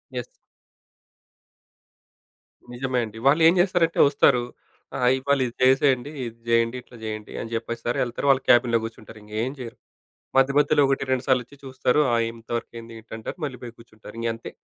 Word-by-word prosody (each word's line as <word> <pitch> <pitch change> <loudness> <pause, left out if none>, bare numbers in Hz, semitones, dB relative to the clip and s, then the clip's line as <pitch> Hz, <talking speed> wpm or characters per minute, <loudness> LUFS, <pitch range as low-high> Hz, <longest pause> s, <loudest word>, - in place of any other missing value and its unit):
Yes. 125 -1 -3 2.5
నిజమే 130 0 -1
అండి. 110 +1 -11
వాళ్ళు 150 +4 +4
ఏం 165 - +6
జేస్తారంటే 175 -2 +2
ఒస్తారు. 135 -3 +3 0.5
ఆహ్, 125 0 +3
"ఇవాళ 140 +1 +1
ఇది 120 - -9
జేసేయండి, 135 +1 +3
ఇది 115 0 -9
జేయండి, 115 +1 +2
ఇట్లా 120 - -16
జేయండి" 110 -1 -6
అని 115 - -7
జెప్పేస్తారు 115 +1 -3
ఎళ్తరు 120 +4 -2
వాళ్ళ 135 -1 +4
క్యాబిన్ 120 -1 +5
గూర్చుంటారు. 110 -1 -10
ఇంగేం 110 +5 -3
జెయ్యరు. 120 -1 -8 0.6
మధ్య 135 +1 +4
మధ్యలో 150 0 +3
ఒకటి, 135 - 0
రెండు 130 0 0
సార్లు 130 -2 +3
ఒచ్చి 140 +4 -18
చూస్తారు. 130 +1 0
"ఆ - - +4 0.2
ఎంత 115 -1 -17
వర్క్ 115 - -9
అయింది? 115 0 -10
ఏంటి?" 110 - -14
అంటారు 110 - -7
మళ్ళీ 130 -4 -7
పోయి 120 -1 -9
గూర్చుంటారు. 110 -2 -14
ఇంగంతే. 115 0 -3
125 Hz, 165 wpm, -24 LUFS, 115-135 Hz, 2.5 s, ఏం